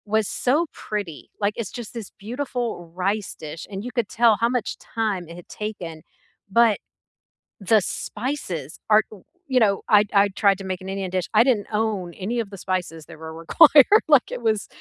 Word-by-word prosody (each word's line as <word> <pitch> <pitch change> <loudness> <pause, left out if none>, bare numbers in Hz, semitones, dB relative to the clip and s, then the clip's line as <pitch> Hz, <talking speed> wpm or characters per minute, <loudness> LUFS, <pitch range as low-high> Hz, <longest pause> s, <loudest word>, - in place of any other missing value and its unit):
was 220 -2 +2
so 295 +7 +1
pretty. 200 -8 -5
Like, 205 +1 +1
it's 230 -5 -4
just 240 -2 -8
this 225 -4 -7
beautiful 235 -6 -4
rice 195 +2 -1
dish 155 +2 -8
and 195 0 -4
you 250 - -5
could 235 -4 0
tell 230 -1 +4
how 235 - +3
much 250 -2 -2
time 210 -6 -3
it 170 - -9
had 175 - -12
taken, 180 -7 -6 0.5
but 230 -1 +4 0.8
the 215 +3 +4
spices 190 - -4
are, 215 0 +6 0.5
you 255 - +6
know 200 -2 +3 0.2
I 205 - +6 0.2
I 205 - +3
tried 200 -2 +5
to 195 - -7
make 185 0 -4
an 190 - -7
Indian 195 -2 -4
dish. 185 - 0
I 230 - +8
didn't 210 -5 +1
own 210 -3 0 0.2
any 240 +3 -1
of 200 - -16
the - - -7
spices 180 -4 -3
that 165 -2 -12
were 160 0 -8
required, 310 - +7
like, 260 - +5
it - - -11
was 215 -2 -1
210 Hz, 190 wpm, -23 LUFS, 185-235 Hz, 0.8 s, I